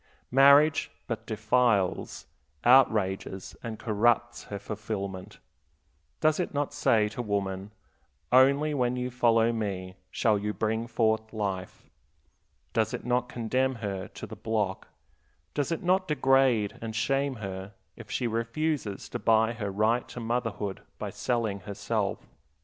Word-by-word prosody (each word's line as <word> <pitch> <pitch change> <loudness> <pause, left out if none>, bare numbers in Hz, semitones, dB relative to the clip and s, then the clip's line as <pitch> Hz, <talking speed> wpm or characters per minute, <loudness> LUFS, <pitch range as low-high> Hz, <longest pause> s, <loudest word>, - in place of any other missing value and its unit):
Marriage 140 +3 +6 0.2
but - - -5
defiles, 120 -7 +1 0.4
outrages, 105 -7 +3
and 115 -2 -5
corrupts 120 +2 +1
her 100 - -5
fulfillment. 100 -2 -5 0.8
Does 155 +1 +3
it 175 - -2
not 145 0 -1
say 110 -7 +3
to 115 +3 -5
woman, 100 -3 -2 0.6
Only 140 +4 +5
when 125 -3 +1
you 125 0 -3
follow 115 -1 +3
me 95 -4 -4
shall 105 +1 +2
you 105 +1 -2
bring 110 +1 -1
forth 110 -1 0
life? 95 -4 -4 0.9
Does - - +1
it - - -8
not 125 0 0
condemn 130 +3 0
her 100 -5 -4
to - - -9
the - - -9
block, 105 -4 -2 0.7
does 145 +2 -1
it 165 - -2
not 185 +1 +2
degrade 135 -7 +2
and 110 -1 -5
shame 135 +4 0
her 95 -2 -7 0.2
if 115 -3 -12
she 125 - -1
refuses 115 0 -2
to - - -4
buy 115 +1 +3
her 105 -3 -4
right 110 +5 +1
to - - -8
motherhood 115 -4 -2 0.2
by - - -5
selling 115 -5 -1
herself? 100 +1 -3
115 Hz, 135 wpm, -28 LUFS, 105-125 Hz, 0.9 s, Marriage